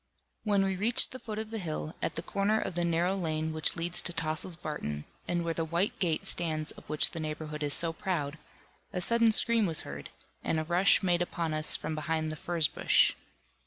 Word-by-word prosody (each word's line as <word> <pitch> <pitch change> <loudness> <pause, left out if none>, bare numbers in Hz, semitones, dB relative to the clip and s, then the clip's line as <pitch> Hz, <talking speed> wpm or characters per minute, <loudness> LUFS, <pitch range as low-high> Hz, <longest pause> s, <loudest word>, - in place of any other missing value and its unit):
When 205 -2 +2
we 190 0 -1
reached 225 +5 +2
the 255 - -8
foot 215 -4 -6
of 220 0 -4
the 225 - -3
hill, 155 -3 -4
at - - -2
the - - -4
corner 205 +2 0
of - - -3
the 175 0 -1
narrow 170 +2 +1
lane 160 -3 -2
which 155 0 +1
leads 175 +1 +1
to 175 - +1
Tossil's 165 +1 -3
Barton, 150 - -5 0.2
and 175 -1 -1
where 165 - -1
the 165 - -2
white 170 +5 -1
gate 165 -5 0
stands 155 -3 +2
of - - -16
which 150 0 +3
the 165 - -6
neighbourhood 155 0 -5
is 145 -1 +5
so 165 -1 +5
proud, 165 -4 -3 0.5
a 180 - -3
sudden 230 +4 +3
scream 230 -1 +5
was 160 -2 0
heard, 70 +1 -8 0.3
and 160 - 0
a - - -1
rush 180 +5 +3
made 175 -2 +2
upon 170 -2 -2
us 155 0 +3
from - - -4
behind 155 0 -2
the - - -5
furze 165 0 +1
bush. - - +3
170 Hz, 215 wpm, -30 LUFS, 155-190 Hz, 0.5 s, is